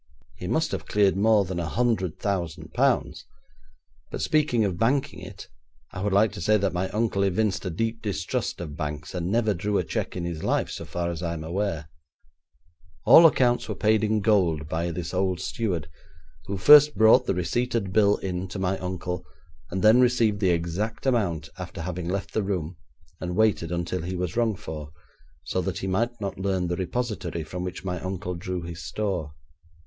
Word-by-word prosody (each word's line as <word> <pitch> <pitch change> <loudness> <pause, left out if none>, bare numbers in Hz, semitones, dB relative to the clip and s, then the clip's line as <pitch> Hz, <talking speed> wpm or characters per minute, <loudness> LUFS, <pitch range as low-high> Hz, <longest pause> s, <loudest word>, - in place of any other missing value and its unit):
'He - - -7
must - - 0
have - - -4
cleared 100 -2 +3
more 105 0 +4
than 90 -1 -4
a 85 - -2
hundred 110 -8 0
thousand 90 -6 -3
pounds, - - +1 0.8
but - - -5
speaking 145 -8 +2
of 90 -3 -2
banking 130 +5 +1
it, - - -10 0.4
I - - -6
would 100 +1 0
like 100 +2 +4
to 105 - -8
say 110 0 +3
that 100 -2 0
my 90 +1 -1
uncle 105 -2 0
evinced 100 +1 +1
a - - -1
deep 115 +6 -2
distrust 105 -3 -2
of 75 -4 -6
banks, 75 -1 -5
and 90 -1 -2
never 110 -1 +2
drew 100 +3 -1
a - - +1
cheque - - -3
in 90 -1 -3
his 85 -2 -5
life - - 0
so - - -6
far 85 0 -3
as 85 -1 -6
I 85 -1 -2
am 80 -2 -5
aware. 85 -2 -2 1.2
All 160 +9 +9
accounts 125 -5 +1
were - - -2
paid 110 0 +2
in 110 0 +1
gold 90 -8 +2
by 80 +2 -2
this 85 +1 -5
old 95 -1 0
steward, 90 -9 -2 0.6
who 100 - -3
first 150 +9 +8
brought 110 +3 +5
the - - +1
receipted 100 +2 -1
bill 105 -1 +4
in 90 0 -4
to 95 - -7
my 95 0 -1
uncle, 90 -1 -4 0.5
and 95 +1 -3
then 110 +4 +7
received 115 -4 +3
the 95 -3 +2
exact 85 +8 -2
amount, 95 - 0
after 90 -1 -6
having 90 0 -4
left 100 +1 -3
the 110 - +1
room, 90 -4 -3 0.4
and 90 0 -4
waited 105 -6 +2
until 85 +1 -2
he 90 +3 -4
was 90 -1 -3
rung 115 -3 +1
for, 80 -7 -7 0.5
so - - -1
that - - -3
he - - -4
might 115 +6 -1
not 100 -2 -4
learn 95 -2 -1
the 90 - 0
repository 95 -3 -3
from 90 +4 -6
which 90 +1 -6
my 90 -2 -2
uncle 95 0 -4
drew 90 0 -4
his 85 +1 -7
store. 90 -8 -3
95 Hz, 195 wpm, -26 LUFS, 85-110 Hz, 1.2 s, All